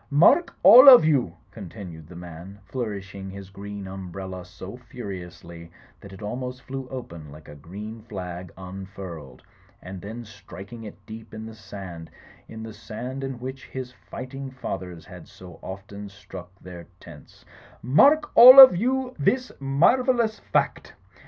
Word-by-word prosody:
"Mark, 165 - +4
all 255 +4 +10
of 250 -11 +9
you," 130 - +1
continued 90 -6 -10
the 90 - -13
man 90 +3 -10
flourishing 100 -3 -6
his 95 0 -10
green 100 0 -8
umbrella 95 -1 -8
so 95 +3 -11
furiously 90 -8 -10 0.3
that 100 - -13
it 95 +2 -11
almost 125 +4 -6
flew 135 -1 -7
open 85 - -9
like 75 +1 -14
a - - -11
green 105 +9 -10
flag 90 -5 -8
unfurled, 95 -7 -10 0.4
and 90 0 -10
then 115 +5 -8
striking 105 +1 -12
it 105 - -12
deep 110 0 -11
in 110 0 -8
the 110 - -9
sand, 95 -6 -10 0.4
in 110 0 -9
the 110 -1 -8
sand 125 +6 -7
in 135 -2 -5
which 130 +2 -8
his 130 -1 -7
fighting 135 +2 -9
fathers 95 -9 -7
had - - -13
so 90 -2 -14
often 100 +2 -9
struck 95 -3 -12
their 90 -2 -11
tents, 75 -4 -16 0.4
"mark 285 - +4
all 255 +3 +11
of 260 -8 +11
you 255 +5 -1
this 250 - 0
marvellous 220 - +2
fact! - - -2
100 Hz, 145 wpm, -24 LUFS, 90-130 Hz, 0.4 s, all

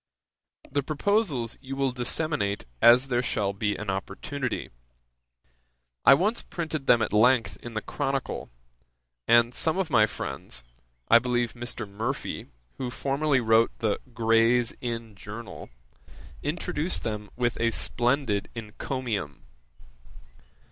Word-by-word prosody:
The 145 +1 +1
proposals 150 - 0
you 135 +1 -6
will 135 -1 +1
disseminate 125 -4 -1 0.2
as 125 +3 +7
there 120 -1 +2
shall 100 -5 -1
be 105 0 -1
an 105 -2 -3
opportunity. 120 +7 -4 1.3
I 135 - +9
once 210 +10 +1
printed 155 -5 -5
them 115 -2 +5
at 110 - -3
length 110 -3 +4
in 120 -2 -8
the 110 - -2
Chronicle, 135 -2 -3 0.8
and 120 +1 +5
some 160 +6 +2
of 185 -5 -1
my 110 -4 +5
friends 70 - -3 0.4
(I 115 - +7
believe 120 -1 0
Mr. 120 -2 -4
Murphy, 115 +7 -4 0.3
who 130 - -2
formerly 140 +1 +1
wrote 115 0 +3
the 110 -3 0
Gray's 115 +1 +3
Inn 115 -2 -4
Journal) 105 +3 -9 0.7
introduced 155 +2 -1
them 105 -2 -4
with 120 -1 -1
a 115 - +3
splendid 120 -2 0
encomium. 110 - -4
120 Hz, 120 wpm, -27 LUFS, 110-135 Hz, 1.3 s, I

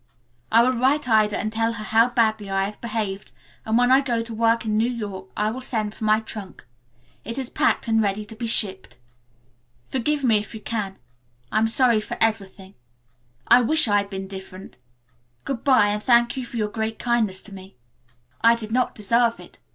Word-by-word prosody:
I 230 +1 +6
will 255 - +3
write 265 +3 +1
Ida 215 -3 +3
and 215 +1 -3
tell 225 +1 0
her 215 -2 -7
how 225 +3 +3
badly 220 -4 0
I 195 0 0
have 205 +1 -8
behaved, 210 -4 -4 0.4
and 220 +1 +2
when 245 +1 +3
I 265 +1 +6
go 240 -4 -1
to 230 0 -8
work 230 +1 +1
in 215 -1 -1
New 225 +3 +2
York 205 -6 -6
I 210 +1 0
will 255 +3 -6
send 220 -5 -3
for 220 - -6
my 215 0 +4
trunk. 210 - -9 0.6
It 230 +3 -6
is 265 -2 -4
packed - - +1
and 225 -1 +2
ready 205 0 -1
to 220 - -11
be 230 +1 -4
shipped. 195 - +1 0.9
"Forgive 285 +3 -1
me 230 -4 +4
if 210 +2 -9
you - - -7
can. 210 -3 -4 0.5
I 215 - +2
am 225 - +2
sorry 235 -1 +3
for - - -6
everything. 200 -3 -1 0.7
I 250 - +7
wish 310 +3 +4
I 205 -1 +3
had 200 0 -1
been 190 -1 -6
different. 190 -5 -11 0.7
Good 270 -4 -4
bye 255 -7 +4
and 210 0 -2
thank 235 0 +3
you 255 -2 -5
for 235 - -7
your 210 -2 -1
great 220 0 -4
kindness 220 -6 0
to 205 - -11
me. 190 0 -12 0.7
I 230 0 +6
did 220 -2 -7
not 250 +2 0
deserve 230 +3 +1
it. - - -15
220 Hz, 205 wpm, -23 LUFS, 210-235 Hz, 0.9 s, I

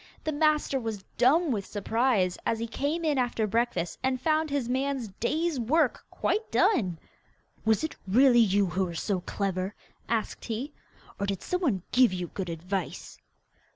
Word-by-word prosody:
The 310 - -1
master 300 -2 +2
was 220 -5 -4
dumb 295 +6 +4
with 205 -5 -1
surprise 210 -3 +1
as 225 - 0
he 230 - -2
came 290 +8 -2
in 295 -4 +2
after 240 -3 0
breakfast 215 -5 -1
and 260 0 0
found 310 +2 +1
his 280 -4 -1
man's 260 -2 -1
day's 305 - -1
work 275 +4 +1
quite 440 +1 -1
done. 185 - +2 0.7
'Was 220 +3 +3
it 315 - -3
really 245 +5 +6
you 200 -3 +4
who 190 +1 0
were 170 -2 -6
so 190 +3 -1
clever?' 190 +1 -2 0.3
asked 225 -2 -2
he. 245 +6 -4 0.5
'Or 200 - -1
did 195 -2 -3
some 360 +1 -1
one 215 - +1
give 250 -5 +5
you 180 -1 -3
good 190 -3 -4
advice? 180 +2 -4
235 Hz, 165 wpm, -28 LUFS, 195-280 Hz, 0.7 s, really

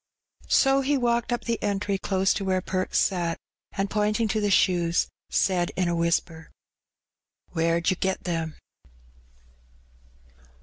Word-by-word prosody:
So 270 0 +4
he 280 +1 +1
walked 240 -1 0
up 240 - -1
the 235 -1 -2
entry 200 -1 -1
close 190 0 +1
to 200 - -3
where 190 -1 +1
Perks 185 0 -2
sat, 175 -3 +1 0.4
and 195 0 -1
pointing 210 +2 0
to 215 +2 0
the 205 - +1
shoes, 175 -3 +2 0.2
said 180 -3 +1
in 185 -1 0
a 170 - 0
whispei 165 -1 -1 1.0
"Where'd 165 +1 +1
yer 185 - -1
get 190 0 -1
them? 165 -3 -3
190 Hz, 135 wpm, -26 LUFS, 170-210 Hz, 1.0 s, So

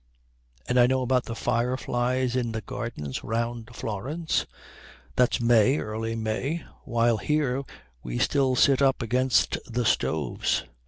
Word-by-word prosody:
And 125 - +2
I 120 - +7
know 130 0 +1
about 125 0 +1
the 115 - -5
fireflies 125 +1 0
in 120 -3 -1
the 110 - -3
gardens 100 - -5
round 115 0 -3
Florence 140 - -2 0.7
that's 125 -1 +3
May, 120 +3 +4
early 115 0 -3
May, 120 +8 -2 0.2
while 115 0 +2
here 140 -1 0 0.4
we - - -4
still 135 - +2
sit 135 +2 +4
up 135 -3 +3
against 125 +2 +2
the 120 +1 0
stoves. 80 - 0
120 Hz, 130 wpm, -26 LUFS, 115-130 Hz, 0.7 s, I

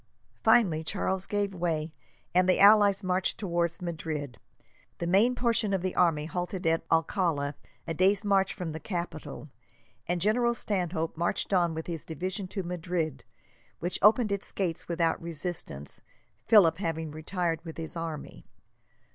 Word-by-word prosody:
Finally, 170 -10 +4
Charles 190 +2 -1
gave 205 -1 -1
way, 165 -3 -2 0.4
and 180 +1 +4
the 185 - +4
allies 205 -1 +6
marched 185 0 0
towards 170 -3 -1
Madrid. 155 -6 -4 0.6
The 170 - -3
main 205 +8 +4
portion 230 -5 +1
of 185 - -3
the 185 - -1
army 165 -4 +2
halted 180 +2 -4
at 165 0 +2
Alcala, 165 -3 +1 0.3
a 165 - -3
day's 195 +5 +3
march 195 -1 +3
from 175 -3 -4
the 160 - -6
capital, 170 -4 -6 0.6
and 175 0 0
General 235 +5 +2
Stanhope 180 -7 -2
marched 170 +4 -1
on 170 -3 +2
with 160 - -4
his 165 -3 -4
division 185 +4 -4
to 195 +1 -4
Madrid, 170 -4 -3 0.5
which 175 +2 -3
opened 215 +2 +5
its 200 0 -3
gates 175 -4 -3
without 165 -1 0
resistance, 165 - -5 0.5
Philip 175 -6 +6
having 160 -4 -3
retired 165 +2 -2
with 165 -2 -8
his 165 +1 -6
army. 155 - -6
175 Hz, 145 wpm, -29 LUFS, 160-195 Hz, 0.6 s, allies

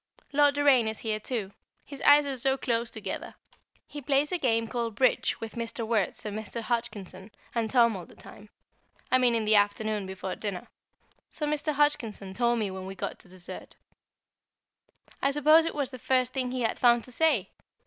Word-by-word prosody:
Lord 290 0 +4
Doraine 280 -5 +4
is 220 -1 -3
here 215 -2 -2
too; 215 -3 -4 0.3
his 280 -2 -10
eyes 290 0 +6
are 275 -1 -2
so 265 +2 +1
close 235 -2 -1
together! 220 - -6 0.5
He 295 - -8
plays 280 +2 +1
a 360 - -1
game 230 -4 +1
called 230 -2 -3
"Bridge" 255 +3 +2
with 225 -1 -7
Mr. 230 0 -4
Wertz 220 -4 0
and 210 -1 -4
Mr. 220 +2 -5
Hodgkinson 215 -5 -4 0.2
and 230 -2 -1
Tom 235 -3 +4
all 180 -3 -8
the - - -17
time 205 +1 -14 0.6
I 255 - +5
mean 245 -2 +3
in 225 -1 0
the 215 - +3
afternoon 205 0 0
before 190 0 -5
dinner 200 -4 -5 0.6
so 300 - -4
Mr. 300 +1 -1
Hodgkinson 230 -9 0
told 240 +3 +1
me 210 -4 -1
when 190 0 -7
we 195 - -7
got - - -5
to - - -9
dessert. 180 0 -9 1.5
I 275 - +3
suppose 305 +3 +5
it - - -4
was 285 -3 -2
the 255 - -9
first 255 +1 +1
thing 255 -2 -1
he 255 0 -3
had 225 - -1
found 240 -1 +4
to 250 - -11
say! 250 - +1
235 Hz, 190 wpm, -28 LUFS, 215-270 Hz, 1.5 s, eyes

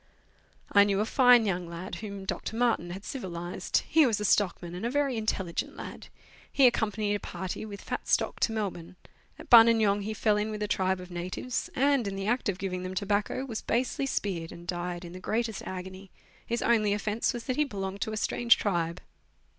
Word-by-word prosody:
I 200 - +7
knew 200 -1 +1
a 210 - +2
fine 245 -2 +6
young 180 -3 -2
lad 170 +2 -7
whom 200 -3 -6
Dr. 220 - -4
Martin 230 -7 +1
had 190 +3 -7
civilized; 175 -7 -3
he 315 -3 +5
was 220 -4 0
a 210 - -2
stockman, 180 -4 +1
and 180 +4 -6
a 235 - 0
very 280 -1 +1
intelligent 190 -6 -2
lad. - - -8 0.4
He 275 - +5
accompanied 215 -3 +2
a 205 - -1
party 185 +3 -5
with 200 -1 -9
fat - - -4
stock - - +1
to - - +2
Melbourne; 195 -6 -4 0.4
at - - -12
Buninyong 225 -3 +7
he 215 +2 -4
fell 210 0 +2
in 210 +1 -1
with 210 -1 -4
a - - -1
tribe 190 -2 0
of 180 0 -10
natives, 180 +8 -3
and, 275 -3 +2
in 195 - -3
the 195 0 -4
act 240 +1 0
of 185 - -2
giving 185 -1 -3
them 185 +1 -5
tobacco, 205 +6 -1
was 230 -5 -5
basely 255 +3 -1
speared, 180 -10 -2
and 170 - -11
died 175 0 -4
in 170 - -9
the 185 - -8
greatest 225 +3 -2
agony. 190 +1 -7 0.4
His 235 +1 -1
only 215 -3 +3
offence 210 +2 0
was 240 -2 -6
that 255 - -2
he 300 - +4
belonged 195 -6 -5
to 220 - -1
a 215 - -3
strange 235 +2 +3
tribe. 170 -3 -1
205 Hz, 205 wpm, -29 LUFS, 185-230 Hz, 0.4 s, I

